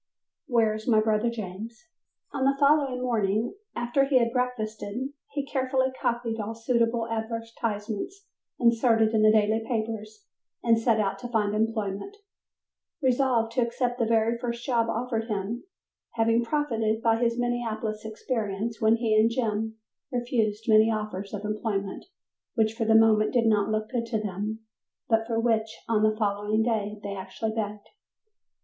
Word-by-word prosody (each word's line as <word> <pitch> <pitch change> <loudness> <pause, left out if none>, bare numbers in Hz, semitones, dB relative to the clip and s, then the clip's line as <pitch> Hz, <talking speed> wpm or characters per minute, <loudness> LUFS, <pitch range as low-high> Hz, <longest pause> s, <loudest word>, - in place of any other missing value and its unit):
"Where 225 -3 +3
is 215 0 -7
my 225 -3 +5
Brother 215 +1 +2
James" 225 - -7 0.5
On 275 -2 -1
the 275 +1 +3
following 280 -3 +3
morning 220 -2 0 0.2
after 240 +3 +1
he 275 -1 +3
had 235 -1 +2
breakfasted, 245 -1 -2 0.2
he 285 -1 -3
carefully 260 -1 0
copied 235 -1 -1
all 215 +2 -4
suitable 230 0 +1
advertisements 230 - -4 0.3
inserted 230 -2 +3
in 220 - +3
the 215 0 +6
daily 215 +1 +2
papers 220 -2 -4 0.4
and 230 -1 +4
set 225 -1 +2
out 200 -2 0
to 245 - -5
find 215 -3 0
employment, 220 - -2 0.8
resolved 255 -4 +2
to 245 - +1
accept 245 +1 -1
the 230 - +2
very 230 +1 +2
first 235 0 -4
job 235 -4 +1
offered 230 -1 -1
him, 220 - -3 0.5
having 230 0 +2
profited 230 -5 0
by 225 -1 +3
his 235 0 +1
Minneapolis 230 -3 -2
experience 220 -1 -3
when 220 +1 +5
he 225 -2 +1
and 215 +1 +5
Jim 220 -2 -1 0.4
refused 225 -3 -1
many 220 0 +6
offers 210 -3 -3
of 210 0 -5
employment 210 -2 -3 0.5
which 220 -2 +2
for 225 0 -2
the 220 0 +4
moment 220 -1 +5
did 240 -2 +3
not 210 -2 +3
look 215 +1 -1
good 235 -2 -1
to 225 -2 -1
them, 210 +2 -4 0.5
but 225 0 +2
for 230 -1 0
which 225 -1 0
on 225 -2 +2
the 215 0 +2
following 210 +1 +1
day 215 -3 -1
they 200 -1 -4
actually 190 +3 -4
begged. 210 -1 -4
225 Hz, 155 wpm, -27 LUFS, 215-240 Hz, 0.8 s, the